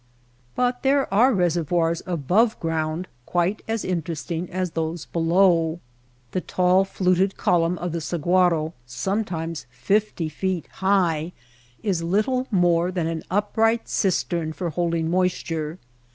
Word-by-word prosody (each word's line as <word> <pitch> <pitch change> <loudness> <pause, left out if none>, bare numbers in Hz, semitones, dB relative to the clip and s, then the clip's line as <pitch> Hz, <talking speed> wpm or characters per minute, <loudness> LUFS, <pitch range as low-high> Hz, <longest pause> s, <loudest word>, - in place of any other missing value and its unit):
But 245 0 0
there 275 -5 +2
are 240 +7 +5
reservoirs 170 - +1
above 185 - +2
ground 165 +1 -2 0.2
quite 175 +4 0
as 225 -1 -2
interesting 170 -1 -3
as 185 -1 -2
those 160 0 -3
below. 170 -1 +2 0.5
The 185 - -1
tall 185 +2 +2
fluted 190 0 +1
column 175 0 +2
of 175 0 -3
the 165 0 -3
sahuaro, 170 0 +1
sometimes 165 - -3
fifty 170 - 0
feet 180 +2 -2 0.2
high, 180 -4 +2 0.5
is 190 -6 0
little 215 +9 0
more 175 -3 +2
than 175 -3 -1
an 165 -1 -2
upright 225 +4 +1
cistern 170 -4 0
for 175 0 -3
holding 170 0 0
moisture. 170 -3 -1
175 Hz, 125 wpm, -24 LUFS, 165-195 Hz, 0.5 s, are